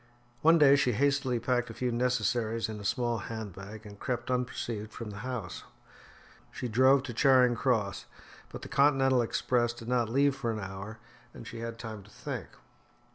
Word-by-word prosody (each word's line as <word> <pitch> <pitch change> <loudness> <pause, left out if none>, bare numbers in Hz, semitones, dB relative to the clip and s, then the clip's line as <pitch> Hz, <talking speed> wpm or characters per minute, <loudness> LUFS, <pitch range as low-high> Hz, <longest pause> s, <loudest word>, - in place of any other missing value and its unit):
One 165 +2 +6
day 140 -3 +7
she 125 -3 +2
hastily 135 0 +1
packed 120 +1 0
a 115 - -8
few 125 -1 -1
necessaries 115 -2 0
in 110 -1 -6
a - - -9
small 120 +2 0
hand 110 -3 -6
bag 105 +4 -10
and 100 -1 -11
crept 125 -1 -3
unperceived 120 -3 -3
from 110 -2 -7
the 100 - -9
house. 115 -6 -5 0.9
She 125 - -5
drove 130 +4 +4
to 130 -4 -6
Charing 130 -1 +5
Cross, 110 -7 0 0.4
but - - -9
the - - -6
Continental 135 -2 +3
Express 120 0 0
did 115 -1 -11
not 120 -2 +1
leave 140 +3 +3
for 135 -4 -3
an 110 - -3
hour, 95 +3 -7 0.4
and - - -10
she 115 - -8
had 115 0 -5
time 110 -3 -7
to - - -17
think. - - -6
120 Hz, 185 wpm, -30 LUFS, 110-130 Hz, 0.9 s, day